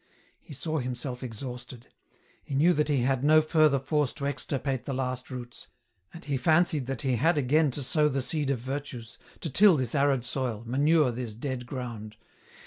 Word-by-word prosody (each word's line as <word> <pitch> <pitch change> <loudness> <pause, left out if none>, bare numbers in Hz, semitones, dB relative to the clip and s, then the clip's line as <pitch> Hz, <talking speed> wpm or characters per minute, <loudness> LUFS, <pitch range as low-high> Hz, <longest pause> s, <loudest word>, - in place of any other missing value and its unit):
He - - -12
saw 155 +3 -2
himself 125 0 -4
exhausted; 125 0 -7 0.6
he 140 - -5
knew 165 +6 +4
that 150 -1 +1
he 145 -4 +1
had 130 0 0
no 155 +2 +6
further 155 -2 +3
force 145 0 0
to 140 - -5
extirpate 135 -1 -3
the 135 - -3
last 130 -1 -3
roots, 120 -2 -8 0.4
and 170 - -12
he 140 -2 -1
fancied 155 -1 +2
that 135 -3 -4
he 130 -3 +1
had 160 +6 +2
again 145 +3 +3
to 135 +2 -3
sow 150 +3 +3
the 135 -2 -1
seed 145 +1 -1
of 140 - +1
virtues, 130 -2 -6 0.2
to 165 - -3
till 190 +3 +6
this 130 -4 -1
arid 140 -3 +2
soil, 125 -4 -3
manure 145 +3 +3
this 120 -2 -5
dead 125 0 -5
ground. 115 -5 -7
135 Hz, 185 wpm, -28 LUFS, 125-150 Hz, 0.6 s, no